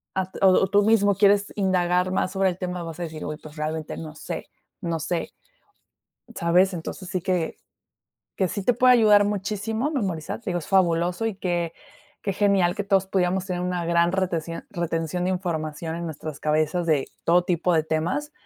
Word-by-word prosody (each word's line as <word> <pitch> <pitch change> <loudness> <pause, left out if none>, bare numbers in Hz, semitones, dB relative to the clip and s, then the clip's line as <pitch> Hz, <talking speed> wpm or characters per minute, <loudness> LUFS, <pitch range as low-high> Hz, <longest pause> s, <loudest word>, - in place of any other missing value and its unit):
a 190 0 -1
o 195 - +7
o 190 +1 +4
tú 205 0 +4
mismo 205 -3 +4
quieres 200 +1 +3
indagar 180 -1 +2
más 185 0 0
sobre 195 0 +1
el 175 - -4
tema, 180 -2 -4
vas 165 -1 -7
a - - -2
deci: 160 -2 -6
"Uy, 150 - -3
pues, 155 0 -12
realmente 155 0 -3
no 155 -1 -8
sé - - -6 0.3
no 165 -1 -2
sé, 170 +3 -2 1.0
¿sabes? 180 +2 +3
Entonces, 175 +2 -6
sí 185 - -2
que 180 -4 -1 0.8
que 190 -2 +1
sí 200 - -4
te 245 +3 +3
puede 250 +1 +6
ayudar 210 -3 +6
muchísimo, 210 +5 -2
memorizar, 195 - -3
te 220 - -4
digo, 175 - 0
es - - -10
fabuloso 180 +1 +2
y 215 -4 -2
que 175 -3 -1 0.5
que 195 - -1
genial 195 -3 +3
que 205 - -2
todos 195 -1 +2
pudiéramos 190 0 0
tener 180 -2 -2
una 180 -1 -2
gran 170 0 +3
reteción, 170 -3 -2
retención 170 -1 -2
de 185 - +1
información, 165 -3 -3
en 170 - -4
nuestras 155 -2 -7
cabezas, 155 +3 +1
de 150 -4 +2 0.2
todo 175 +1 +4
tipo 180 -1 +1
de 155 -1 +2
temas, 170 - -1
180 Hz, 190 wpm, -24 LUFS, 165-195 Hz, 1.0 s, o